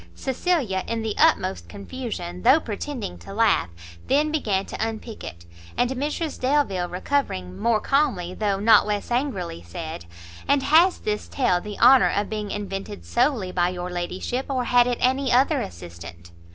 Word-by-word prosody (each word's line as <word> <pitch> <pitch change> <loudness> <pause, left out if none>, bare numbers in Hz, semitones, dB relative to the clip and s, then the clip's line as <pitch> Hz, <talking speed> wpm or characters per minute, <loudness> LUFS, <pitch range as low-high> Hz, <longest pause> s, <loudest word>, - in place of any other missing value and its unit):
Cecilia, 265 - -1
in 230 -1 -2
the 220 -1 -2
utmost 195 -12 +2
confusion, 200 -5 -6
though 260 +6 +6
pretending 225 - -5
to 195 - -10
laugh, 220 - +3 0.4
then 300 +3 +2
began 205 -11 0
to - - -4
unpick 225 0 -7
it; 85 0 -9 0.3
and 245 +1 +2
Mrs 295 +4 -3
Delvile, 255 -10 +1
recovering, 180 - -2
more 230 -2 +2
calmly, 195 -12 0
though 200 -1 -1
not 215 0 +5
less 210 +2 -2
angrily, 215 - -2
said 85 0 -7 0.4
"And 280 -1 +3
has 340 +5 +5
this 210 0 -3
tale 180 -10 +1
the 210 +1 -7
honour 265 -1 +6
of 205 +1 -1
being 210 -1 -3
invented 200 0 -5
solely 240 -7 +1
by 175 -1 +1
your 180 0 -5
ladyship, 180 +8 -3
or 260 -2 0
had 245 0 +4
it 245 -1 0
any 265 +1 +2
other 255 +3 +3
assistant?" 85 -1 -9
215 Hz, 160 wpm, -24 LUFS, 180-265 Hz, 0.4 s, though